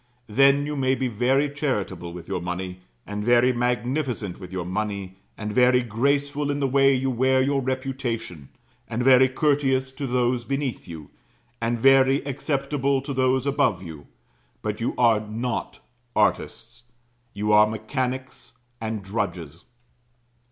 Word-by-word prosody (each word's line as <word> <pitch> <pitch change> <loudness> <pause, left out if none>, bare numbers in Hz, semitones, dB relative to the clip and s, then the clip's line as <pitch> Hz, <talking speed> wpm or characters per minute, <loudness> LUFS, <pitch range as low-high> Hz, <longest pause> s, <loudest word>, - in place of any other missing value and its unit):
Then, 135 +5 +4
you 150 0 -3
may 130 -1 +1
be 130 -1 -1
very 125 +5 +1
charitable 105 - -3
with 85 -1 -9
your 95 -2 -3
money, 90 +1 -5 0.3
and 105 0 -4
very 120 +2 +4
magnificent 120 - -2
with 90 -2 -10
your 95 -2 -4
money, 100 0 -4 0.2
and 105 -1 -4
very 125 +1 +4
graceful 140 +5 0
in 145 0 -1
the 140 - +1
way 135 +1 +4
you 130 0 0
wear 130 +2 +2
your 135 +1 +1
reputation, 130 - -4 0.4
and 120 +1 -2
very 130 0 +6
courteous 135 -2 +1
to 135 +1 -5
those 125 -1 0
beneath 135 -1 -3
you, 80 -4 -9 0.5
and 115 +1 0
very 135 +2 +4
acceptable 140 0 -1
to 140 0 -4
those 130 0 +1
above 135 -10 +1
you; 80 -4 -10 0.6
but 105 +1 -3
you 115 - -1
are 115 -3 +4
not 115 +3 -4 0.3
artists. 110 +3 -1 0.5
You 105 +1 -1
are 105 0 +6
mechanics, 125 +5 -4 0.3
and 110 -2 -3
drudges. 90 -6 -4
125 Hz, 145 wpm, -24 LUFS, 105-135 Hz, 0.6 s, very